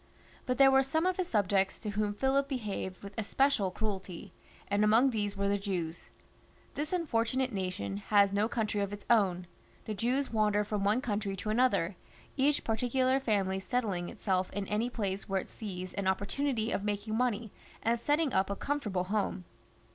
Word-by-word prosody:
But 255 Hz, -1 st, 0 dB
there 270 Hz, 0 st, +7 dB
were 265 Hz, 0 st, +6 dB
some 315 Hz, +5 st, 0 dB
of 370 Hz, -1 st, +1 dB
his 370 Hz, -2 st, -1 dB
subjects 195 Hz, -2 st, +1 dB
to 210 Hz, -, -3 dB
whom 205 Hz, 0 st, -1 dB
PhUip 270 Hz, +4 st, +2 dB
behaved 210 Hz, -8 st, -4 dB
with 200 Hz, 0 st, -8 dB
especial 225 Hz, -2 st, +2 dB
cruelty, 190 Hz, -3 st, -5 dB, 0.3 s
and 205 Hz, +1 st, +2 dB
among 225 Hz, +5 st, +5 dB
these 205 Hz, -3 st, -2 dB
were 200 Hz, 0 st, 0 dB
the 200 Hz, 0 st, +1 dB
Jews. 180 Hz, -5 st, -4 dB, 0.6 s
This 295 Hz, +2 st, -3 dB
unfortunate 260 Hz, -6 st, 0 dB
nation 185 Hz, -, -3 dB
has 200 Hz, -, +3 dB
no 205 Hz, +2 st, +2 dB
country 215 Hz, -3 st, -1 dB
of 200 Hz, 0 st, -2 dB
its 205 Hz, 0 st, -8 dB
own; 185 Hz, -6 st, +3 dB, 0.4 s
the 215 Hz, -, -3 dB
Jews 245 Hz, +6 st, 0 dB
wander 210 Hz, -1 st, +2 dB
from 210 Hz, -1 st, -2 dB
one 210 Hz, +5 st, +2 dB
country 205 Hz, -4 st, -2 dB
to 215 Hz, +3 st, -3 dB
another, 215 Hz, -6 st, +2 dB, 0.4 s
each 285 Hz, +2 st, +2 dB
parti 225 Hz, +2 st, -1 dB
ctdar 260 Hz, +1 st, +2 dB
family 195 Hz, -5 st, +1 dB
settling 190 Hz, -4 st, -1 dB
itself 185 Hz, -2 st, -1 dB
in 200 Hz, 0 st, -3 dB
any 220 Hz, +4 st, 0 dB
place 200 Hz, -5 st, -3 dB
where 195 Hz, 0 st, +1 dB
it -, -, -13 dB
sees 185 Hz, -4 st, -6 dB
an 200 Hz, -1 st, -2 dB
opportunity 220 Hz, +5 st, 0 dB
of 200 Hz, -, -1 dB
making 210 Hz, +1 st, -2 dB
money, 230 Hz, -3 st, 0 dB, 0.3 s
and 230 Hz, +1 st, +2 dB
setting 295 Hz, +2 st, +1 dB
up 190 Hz, +1 st, +2 dB
a 200 Hz, -, -1 dB
comfort 290 Hz, 0 st, -2 dB
able 185 Hz, -2 st, 0 dB
home. 195 Hz, -1 st, -1 dB
210 Hz, 185 wpm, -31 LUFS, 195-250 Hz, 0.6 s, there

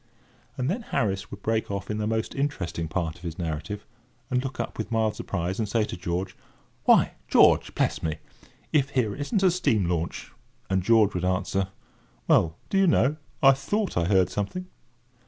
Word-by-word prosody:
And 125 Hz, -, -1 dB
then 195 Hz, -, -1 dB
Harris 95 Hz, -, -1 dB
would 100 Hz, 0 st, -10 dB
break 110 Hz, 0 st, 0 dB
off 100 Hz, 0 st, -4 dB
in 105 Hz, -, -2 dB
the 105 Hz, -, -1 dB
most 110 Hz, 0 st, -1 dB
interesting 95 Hz, -, -2 dB
part 80 Hz, 0 st, -2 dB
of -, -, -18 dB
his 85 Hz, -2 st, -6 dB
narrative, 85 Hz, +5 st, -4 dB, 0.5 s
and 125 Hz, 0 st, +1 dB
look 135 Hz, -1 st, -5 dB
up -, -, -4 dB
with -, -, -4 dB
mild 110 Hz, -2 st, +1 dB
surprise, 90 Hz, +1 st, -3 dB
and 110 Hz, -2 st, -1 dB
say 115 Hz, 0 st, +2 dB
to 105 Hz, -, -4 dB
George: 90 Hz, +1 st, -3 dB, 0.5 s
"Why, -, -, +5 dB, 0.2 s
George, -, -, +5 dB
bless -, -, 0 dB
me, 80 Hz, -1 st, -2 dB, 0.6 s
if 140 Hz, -3 st, +3 dB
here 125 Hz, -7 st, 0 dB
isn't 170 Hz, -, -1 dB
a 185 Hz, -, +6 dB
steam 115 Hz, -, +1 dB
launch!" 85 Hz, -1 st, -3 dB, 0.4 s
And 95 Hz, 0 st, +2 dB
George 110 Hz, +1 st, +4 dB
would 90 Hz, -, -2 dB
answer: 95 Hz, +1 st, 0 dB, 0.6 s
"Well, 80 Hz, 0 st, +3 dB
do 195 Hz, -, +3 dB
you 195 Hz, -, +5 dB
know, 150 Hz, -2 st, +3 dB, 0.3 s
I 135 Hz, -, +9 dB
thought 195 Hz, +10 st, -1 dB
I 85 Hz, -, +2 dB
heard 95 Hz, -1 st, +3 dB
something!" 105 Hz, -, -3 dB
105 Hz, 185 wpm, -26 LUFS, 90-130 Hz, 0.6 s, I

